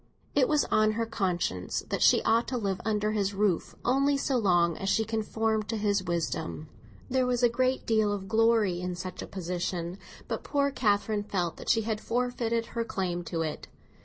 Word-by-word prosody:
It 270 -3 +4
was 300 -1 +2
on 215 0 +4
her 230 +1 -1
conscience 175 - -2
that - - -2
she - - +5
ought 230 +1 +3
to 255 - -2
live 195 -5 -2
under 210 0 0
his 205 -2 -1
roof 195 -4 0
only 275 +3 +3
so 275 -1 0
long 175 -7 +3
as 195 - -2
she 220 +2 +2
conformed 220 -1 -1
to 225 - -1
his 205 -1 +1
wisdom. 165 -3 -3 0.4
There 260 0 +1
was 245 0 0
a 240 - +6
great 255 +2 0
deal 220 -2 +2
of 195 -2 -4
glory 220 -4 +3
in 180 0 -3
such 185 0 -6
a - - -6
position, 180 0 -3 0.3
but - - -3
poor 280 -1 +1
Catherine 210 -3 +1
felt 180 -5 -2
that - - -7
she 225 - +4
had 220 -1 -2
forfeited 235 -1 -1
her 235 - 0
claim 180 -5 -2
to 165 0 -2
it. 155 -1 -5
210 Hz, 190 wpm, -28 LUFS, 185-230 Hz, 0.4 s, a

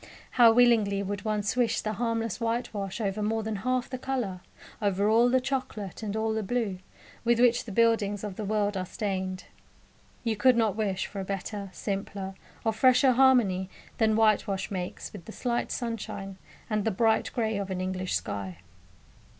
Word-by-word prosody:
How 235 -2 +7
willingly 225 -4 +4
would 200 +1 -4
one 210 -1 0
swish 235 +3 +1
the 215 - -2
harmless 230 -1 -1
whitewash 225 -4 -2
over 210 -1 -1
more 220 +1 0
than 215 -1 -3
half 255 +4 -1
the 255 - -6
colour 245 -9 -3 0.4
over 200 0 +1
all 230 +3 +5
the 260 +1 +4
chocolate 250 - -4
and 210 -1 -3
all 220 0 0
the 220 - -1
blue 210 -3 -2 0.4
with 235 0 +3
which 245 0 +4
the 225 - -7
buildings 210 -2 +2
of 205 -3 -5
the 215 - -5
world 205 0 0
are 185 -1 -3
stained! 190 -3 -3 0.8
You 225 -2 0
could 250 +3 +4
not 220 -4 +2
wish 200 -4 -1
for 200 - -7
a - - -2
better, 195 +1 -4
simpler, 195 0 -4 0.3
or 225 - +2
fresher 255 +3 +5
harmony 235 -8 +4 0.3
than 220 -1 +3
whitewash 210 -3 +2
makes 180 -2 -5
with 195 -5 -10
the - - -8
slight 240 +1 -2
sunshine 200 -5 -4 0.3
and 215 -2 0
the 225 - +1
bright 220 +2 +2
grey 220 -4 -1
of 200 -1 -4
an 185 -1 -3
English 185 0 -2
sky. 95 -3 -4
215 Hz, 175 wpm, -28 LUFS, 195-230 Hz, 0.8 s, How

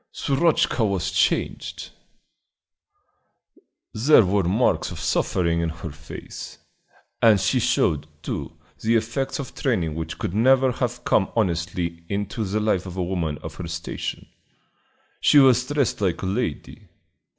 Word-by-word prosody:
Shurochka 140 -3 +1
was 100 -5 0
changed; - - -1 2.0
there 115 0 +5
were 100 +2 +2
marks 105 +8 +1
of - - -7
suffering 85 -2 0
in 85 - 0
her 80 0 -7
face, 75 +3 -9 0.6
and 110 -3 +6
she 95 - +1
showed, 75 -1 +1 0.2
too, - - -5 0.2
the 115 +1 +2
effects 115 +5 -1
of 140 -4 -6
training 90 - -1
which 80 +1 -5
could 105 -6 -3
never 130 +4 +4
have 120 0 -3
come 95 - +2
honestly 85 -4 -1
into 105 +2 -2
the 105 +1 -1
life 100 -3 0
of 90 0 -8
a 90 - 0
woman 85 -5 -2
of - - -6
her 90 - -5
station. 85 0 -5 0.9
She - - +5
was 130 -2 +6
dressed 145 -7 0
like 95 -3 0
a - - -1
lady. 95 -4 -3
100 Hz, 140 wpm, -23 LUFS, 85-120 Hz, 2.0 s, and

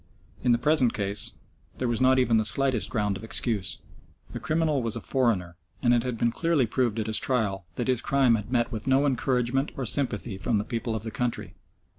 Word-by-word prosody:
In 125 - +3
the 120 - +4
present 130 -2 +2
case 100 0 -1 0.4
there 130 - -1
was 120 -1 -1
not 130 0 +4
even 125 -3 +3
the 110 - +2
slightest 130 +1 +2
ground 105 -3 -1
of - - -12
excuse. 110 -4 0 0.6
The - - -4
criminal 155 -3 0
was 115 -1 -1
a - - -3
foreigner, 105 - 0 0.3
and 120 -1 +4
it 120 - +3
had 125 -1 -4
been 115 +1 +1
clearly 165 -2 +1
proved 115 -1 -1
at 110 - -1
his 110 0 +1
trial 100 -8 -1
that 120 - -3
his 125 -2 +1
crime 135 -3 +3
had 110 +1 -2
met 120 -1 +1
with 110 0 -6
no 135 +2 +3
encouragement 130 0 0
or 135 - -3
sympathy 120 -5 -1
from 110 +2 +1
the 100 - -1
people 115 -1 -3
of 110 - -4
the 110 - -5
country. 125 0 -3
120 Hz, 215 wpm, -26 LUFS, 110-130 Hz, 0.6 s, the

